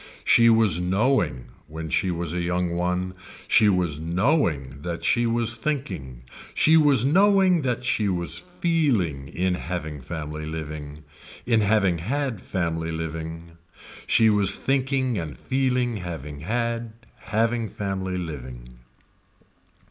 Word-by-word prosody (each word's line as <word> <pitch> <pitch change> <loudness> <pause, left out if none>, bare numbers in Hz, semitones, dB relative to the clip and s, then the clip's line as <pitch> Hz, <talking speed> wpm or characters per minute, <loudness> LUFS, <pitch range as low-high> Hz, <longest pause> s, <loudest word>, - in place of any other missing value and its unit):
She 115 0 +5
was 110 -7 +4
knowing, 95 - +1 0.2
when 80 0 -7
she 95 - +1
was 85 -2 -3
a 90 - -1
young 90 0 -1
one, 90 +1 -1 0.3
she 105 - +5
was 90 -6 0
knowing 85 - 0
that 85 +1 -5
she 120 0 +2
was 115 0 +1
thinking, 90 - -4 0.3
she 160 - +5
was 145 -6 +5
knowing 190 +2 +4
that 125 -2 -2
she 110 -4 +1
was 85 -2 -1
feeling 140 - 0
in 90 +5 -1
having 85 -5 -5
family 75 +1 -6
living, 75 -2 -7 0.4
in 115 -2 +3
having 100 -4 +2
had 130 - -2
family 80 -2 -2
living. 80 +1 -6 0.5
She 110 - +4
was 100 -1 +4
thinking 130 -4 0
and 80 -3 -6
feeling 125 -3 0
having 80 -6 -7
had, 115 +5 -2 0.3
having 115 +1 0
family 95 -2 -3
living. 65 -7 -8
90 Hz, 125 wpm, -24 LUFS, 80-120 Hz, 0.5 s, She